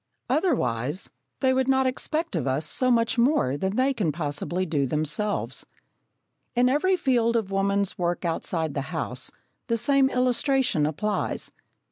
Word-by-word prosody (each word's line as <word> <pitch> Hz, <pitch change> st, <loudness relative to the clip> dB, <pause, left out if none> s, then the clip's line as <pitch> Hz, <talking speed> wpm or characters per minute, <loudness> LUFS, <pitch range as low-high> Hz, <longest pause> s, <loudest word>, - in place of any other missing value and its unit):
Otherwise, 180 Hz, -, 0 dB, 0.3 s
they 260 Hz, -1 st, +3 dB
would 260 Hz, 0 st, +1 dB
not 265 Hz, 0 st, +3 dB
expect 305 Hz, -, -1 dB
of 145 Hz, -5 st, -1 dB
us 135 Hz, +4 st, 0 dB
so 255 Hz, +8 st, +1 dB
much 235 Hz, 0 st, +2 dB
more 235 Hz, -, +3 dB
than 190 Hz, +6 st, -2 dB
they 265 Hz, +3 st, +2 dB
can 200 Hz, -11 st, 0 dB
possibly 155 Hz, +4 st, -2 dB
do 145 Hz, -5 st, 0 dB
themselves. 155 Hz, +9 st, -1 dB, 0.9 s
In 245 Hz, +1 st, +4 dB
every 370 Hz, +8 st, +2 dB
field 240 Hz, -7 st, +1 dB
of 215 Hz, -4 st, 0 dB
woman's 200 Hz, 0 st, 0 dB
work 175 Hz, 0 st, -1 dB
outside 165 Hz, -2 st, -1 dB
the 140 Hz, -, -2 dB
house, -, -, -3 dB, 0.4 s
the 230 Hz, -2 st, +1 dB
same 270 Hz, +3 st, +3 dB
illustration 250 Hz, -, +2 dB
applies. 205 Hz, +8 st, -2 dB
210 Hz, 145 wpm, -25 LUFS, 160-260 Hz, 0.9 s, In